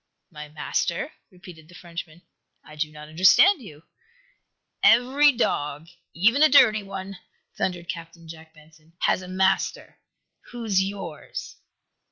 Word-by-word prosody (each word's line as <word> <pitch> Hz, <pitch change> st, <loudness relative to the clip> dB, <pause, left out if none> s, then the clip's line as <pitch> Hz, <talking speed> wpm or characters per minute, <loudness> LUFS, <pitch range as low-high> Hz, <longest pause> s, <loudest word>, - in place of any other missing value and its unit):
"My 150 Hz, -2 st, -10 dB
master?" 170 Hz, -, -3 dB, 0.2 s
repeated 180 Hz, -4 st, -15 dB
the 180 Hz, -, -16 dB
Frenchman. 170 Hz, -1 st, -9 dB, 0.4 s
"I 150 Hz, -, -14 dB
do 155 Hz, 0 st, -3 dB
not 150 Hz, 0 st, -12 dB
understand 190 Hz, -, +5 dB
you." 160 Hz, -8 st, -13 dB, 1.0 s
"Every 265 Hz, +5 st, +5 dB
dog, 150 Hz, -, -2 dB, 0.3 s
even 230 Hz, -, +3 dB
a 310 Hz, -, +7 dB
dirty 225 Hz, -7 st, +5 dB
one," 195 Hz, -1 st, -8 dB, 0.4 s
thundered 175 Hz, -2 st, -3 dB
Captain 170 Hz, -1 st, -8 dB
Jack 160 Hz, 0 st, -12 dB
Benson, 155 Hz, +1 st, -22 dB
"has -, -, +1 dB
a 185 Hz, -, -10 dB
master! 190 Hz, +1 st, -1 dB, 0.5 s
Who's 225 Hz, -6 st, -1 dB
yours?" 190 Hz, -6 st, -7 dB
175 Hz, 125 wpm, -24 LUFS, 160-205 Hz, 1.0 s, a